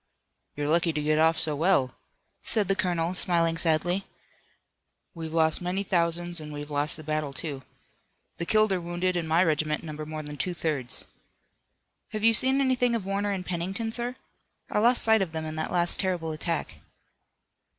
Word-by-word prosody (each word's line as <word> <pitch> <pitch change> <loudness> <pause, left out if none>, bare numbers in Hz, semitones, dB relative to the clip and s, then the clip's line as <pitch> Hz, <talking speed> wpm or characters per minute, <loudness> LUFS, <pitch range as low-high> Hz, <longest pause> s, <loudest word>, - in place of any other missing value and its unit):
"You're 145 0 -2
lucky 165 +2 +2
to 150 - -1
get 155 +1 +2
off 160 0 +4
so 160 -2 +1
well," 145 -5 +2 0.5
said 210 -4 +1
the 195 - +2
colonel, 175 -2 0
smiling 170 -2 +2
sadly. 175 +3 0 1.1
"We've 160 -2 -6
lost 160 0 +2
many 180 +3 -1
thousands 175 -2 0
and 150 0 -8
we've 145 0 -7
lost 145 +1 0
the 155 - -10
battle, 155 -2 -2
too. 140 -1 -5 0.8
The 170 - -4
killed 215 -1 +4
or 185 -2 0
wounded 175 +2 -1
in 170 -2 -1
my 165 +3 +4
regiment 155 -2 0
number 155 -1 -6
more 155 0 -5
than 150 0 -8
two 175 +7 -2
thirds." 150 -7 -2 1.1
"Have 215 0 -3
you 225 0 +6
seen 265 +4 +5
anything 250 -3 +2
of 215 -5 -3
Warner 200 +1 -1
and 190 -2 -3
Pennington, 190 +6 -3
sir? 240 +2 -4 0.6
I - - +2
lost 240 +3 +3
sight 220 -1 +5
of 175 -4 -2
them 160 0 -3
in 155 - -5
that 155 - -2
last 175 -1 +3
terrible 180 -4 -1
attack." 160 +1 -3
170 Hz, 180 wpm, -27 LUFS, 155-190 Hz, 1.1 s, you